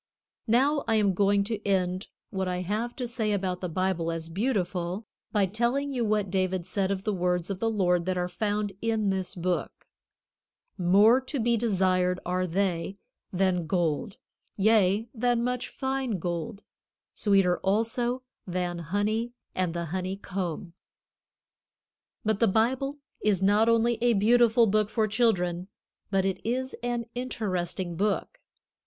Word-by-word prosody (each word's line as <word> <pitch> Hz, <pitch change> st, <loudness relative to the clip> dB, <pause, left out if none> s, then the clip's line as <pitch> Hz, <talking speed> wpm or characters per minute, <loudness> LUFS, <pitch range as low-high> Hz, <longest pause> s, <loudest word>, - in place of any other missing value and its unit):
Now 275 Hz, +6 st, +3 dB
I 225 Hz, -, +3 dB
am 205 Hz, -3 st, +3 dB
going 200 Hz, +1 st, +3 dB
to 210 Hz, 0 st, -4 dB
end 185 Hz, -1 st, 0 dB, 0.2 s
what 190 Hz, -2 st, -2 dB
I 180 Hz, 0 st, -1 dB
have 215 Hz, +6 st, -2 dB
to 250 Hz, -, -3 dB
say 230 Hz, -3 st, -1 dB
about 185 Hz, -2 st, -2 dB
the 180 Hz, -, -3 dB
Bible 175 Hz, -1 st, 0 dB
as 165 Hz, 0 st, -4 dB
beautiful, 185 Hz, -1 st, -1 dB, 0.3 s
by 205 Hz, -2 st, +3 dB
telling 240 Hz, +8 st, 0 dB
you 250 Hz, -3 st, -1 dB
what 210 Hz, -3 st, 0 dB
David 185 Hz, -2 st, 0 dB
said 190 Hz, 0 st, -1 dB
of 195 Hz, -1 st, -2 dB
the 215 Hz, -, 0 dB
words 180 Hz, 0 st, 0 dB
of 190 Hz, -, -4 dB
the 225 Hz, -, +1 dB
Lord 180 Hz, -5 st, +1 dB
that 185 Hz, -1 st, 0 dB
are 180 Hz, 0 st, 0 dB
found 205 Hz, +2 st, -2 dB
in 220 Hz, -3 st, +1 dB
this 190 Hz, -1 st, -3 dB
book: 180 Hz, 0 st, -2 dB, 0.9 s
"More 205 Hz, +7 st, +5 dB
to 265 Hz, +2 st, -4 dB
be 235 Hz, +1 st, +2 dB
desired 185 Hz, -5 st, +1 dB
are 185 Hz, +1 st, 0 dB
they 185 Hz, +1 st, -1 dB, 0.3 s
than 185 Hz, -3 st, +1 dB
gold, 175 Hz, 0 st, -1 dB, 0.4 s
yea, 210 Hz, 0 st, +3 dB
than 240 Hz, 0 st, +1 dB
much 250 Hz, 0 st, -1 dB
fine 265 Hz, -5 st, -2 dB
gold; 175 Hz, +5 st, -4 dB, 0.5 s
sweeter 195 Hz, -4 st, +3 dB
also 230 Hz, +5 st, 0 dB, 0.2 s
than 175 Hz, -1 st, -2 dB
honey 210 Hz, +8 st, -1 dB, 0.2 s
and 180 Hz, -2 st, -1 dB
the 170 Hz, 0 st, -2 dB
honey 185 Hz, +1 st, -2 dB
comb." 180 Hz, -3 st, -4 dB, 1.5 s
But 215 Hz, -1 st, +1 dB
the 230 Hz, -, +4 dB
Bible 255 Hz, +7 st, +1 dB, 0.2 s
is 200 Hz, -3 st, +2 dB
not 210 Hz, +3 st, +4 dB
only 230 Hz, 0 st, +3 dB
a 240 Hz, 0 st, +4 dB
beautiful 230 Hz, +2 st, +5 dB
book 215 Hz, 0 st, +2 dB
for 220 Hz, -1 st, +1 dB
children, 185 Hz, -6 st, +1 dB, 0.4 s
but 195 Hz, -1 st, +1 dB
it 190 Hz, -1 st, -2 dB
is 260 Hz, +3 st, -2 dB
an 240 Hz, -1 st, -2 dB
interesting 185 Hz, -8 st, -3 dB
book. 210 Hz, -, -1 dB
200 Hz, 150 wpm, -27 LUFS, 180-230 Hz, 1.5 s, More